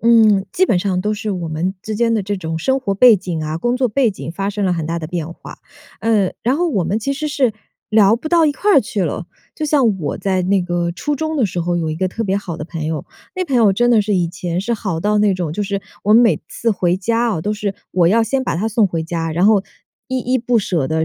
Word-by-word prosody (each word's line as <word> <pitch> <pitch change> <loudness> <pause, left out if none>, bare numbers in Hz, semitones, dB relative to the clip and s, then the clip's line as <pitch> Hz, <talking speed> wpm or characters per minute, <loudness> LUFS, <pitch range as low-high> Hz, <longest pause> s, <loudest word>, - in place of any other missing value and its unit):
嗯， 220 -4 +4
基 370 +1 +3
本 210 - +2
上 185 -1 -1
都 210 +2 0
是 215 0 -3
我 175 -4 -3
们 170 +5 -2
之 215 - -4
间 230 +1 +1
的 215 - 0
这 205 +2 -2
种 160 -2 -4
生 265 +10 0
活 200 -7 -1
背 240 +3 +7
景 175 -4 -4
啊、 155 +1 -3
工 240 +6 0
作 255 -1 +1
背 235 +1 +2
景 175 -4 -7
发 195 +3 -3
生 205 0 -2
了 185 - +2
很 165 -3 -2
大 170 +1 -2
的 155 - -5
变 165 -1 -4
化， - - -12 0.4
呃， 215 -4 +2
然 250 +4 +1
后 350 +2 +1
我 205 - 0
们 200 +6 0
其 275 +5 -2
实 305 +2 -3
是 270 -5 +1 0.4
聊 215 0 +5
不 250 - -9
到 330 -1 +4
一 295 - +2
块 385 +2 +3
去 205 -2 -3
了。 165 +2 -3 0.3
就 310 - -3
像 255 -10 +2
我 145 -3 -2
在 190 -2 0
那 190 +1 +2
个 175 -1 -1
初 295 +11 -2
中 315 +2 -2
的 260 - +2
时 180 -3 -2
候， 175 +1 -1
有 165 -2 -1
一 - - -2
个 185 +3 -1
特 225 +4 -4
别 190 0 0
好 180 -5 -6
的 150 - -6
朋 160 -2 -5
友， 160 -1 -3 0.3
那 370 - 0
朋 280 -6 -3
友 225 -5 +5
真 240 +5 +2
的 230 -3 +5
是 205 0 0
以 180 -2 +2
前 175 0 -4
是 235 - -1
好 190 -7 -2
到 210 +4 +1
那 205 -2 +3
种， 175 -4 -3
就 205 +5 -2
是 200 -1 -3 0.2
我 210 +2 +4
每 230 0 +5
次 230 - -1
回 180 -3 +1
家 230 +5 0
啊， - - -3
都 210 - -1
是 205 -2 -3 0.2
我 175 -2 +3
要 225 +4 +4
先 260 +4 0
把 245 - -2
她 200 +6 -1
送 225 -1 +2
回 165 -3 -3
家， 165 0 -3
然 170 +4 +1
后 210 -2 +5 0.5
依 260 - -1
依 255 +2 0
不 240 0 +1
舍 170 -9 -1
的， 160 0 0
200 Hz, 295 characters per minute, -18 LUFS, 175-235 Hz, 0.5 s, 背